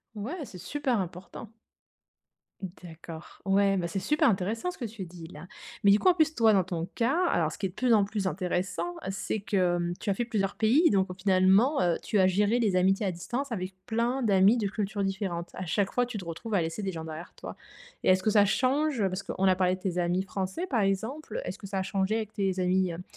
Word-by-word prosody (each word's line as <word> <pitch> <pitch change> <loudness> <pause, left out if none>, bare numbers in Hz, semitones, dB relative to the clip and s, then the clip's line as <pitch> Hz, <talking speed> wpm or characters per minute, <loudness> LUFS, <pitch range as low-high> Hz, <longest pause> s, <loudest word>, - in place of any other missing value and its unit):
Ouais, 285 - -5
c'est 185 - -11
super 255 +5 -1
important! 185 +4 -7 1.3
D'accord. 165 -1 -11
Ouais, 195 0 +3
bah 175 -3 -1
c'est 195 - -2
super 300 +5 +2
intéressant 220 - -1
ce - - -14
que 240 - -4
tu 215 -3 -7
dis, 170 -1 -10
là. 160 +1 -11 0.4
Mais 200 - +7
du 205 - +5
coup, - - +1
en 365 - +7
plus, 315 -2 +2
toi, 225 -5 +4
dans 190 - +4
ton 170 -1 -3
cas, 270 +10 +1
alors 160 - +1
ce - - -8
qui 200 - -3
est - - 0
de 180 - -15
plus 250 0 +2
en 205 -2 +4
plus 205 -1 -3
intéressant 180 -1 -2
c'est 195 +2 -3
que, 185 -4 +1
hem, 175 0 -1
tu - - -4
as - - +3
fait 240 - -1
plusieurs 205 -4 -1
pays, 265 +10 +4
donc 190 -2 +2
au - - -4
finalement, 190 +8 +3
heu, 175 -2 +2
tu 210 - 0
as 185 - +5
géré 205 +5 +2
les 205 -5 +2
amitiés 195 +3 +2
à 190 - +1
distance 240 +10 -4
avec 185 -3 -4
plein 240 +3 0
d'amis 200 +2 +5
de 205 -3 0
cultures 205 0 -2
différentes. 190 -3 -3
À 185 - -5
chaque 195 +4 0
fois, 245 - +1
tu 245 -3 -6
te 190 - -6
retrouves 170 +7 -6
à 195 - +3
laisser 165 +5 -3
des 190 -2 -2
gens 160 - -5
derrière 160 +2 -8
toi - - -9 0.5
et - - +3
est-ce 185 0 +4
que 215 - +2
ça 205 -1 +5
change? 265 +4 +1
Parce 185 +1 -4
qu'on 195 0 -2
a 185 - +5
parlé 185 -1 +2
de 185 - -16
tes 180 -2 -2
amis 180 +1 +1
français, 195 - -3
par 245 - 0
exemple, 225 - -2
est-ce - - -5
que 200 - -9
ça 195 -1 -2
a - - -1
changé 195 +2 0
avec 220 -1 -3
tes 195 -3 -1
amis, 185 0 +2
hem, 170 +2 -7
195 Hz, 245 wpm, -28 LUFS, 180-225 Hz, 1.3 s, Mais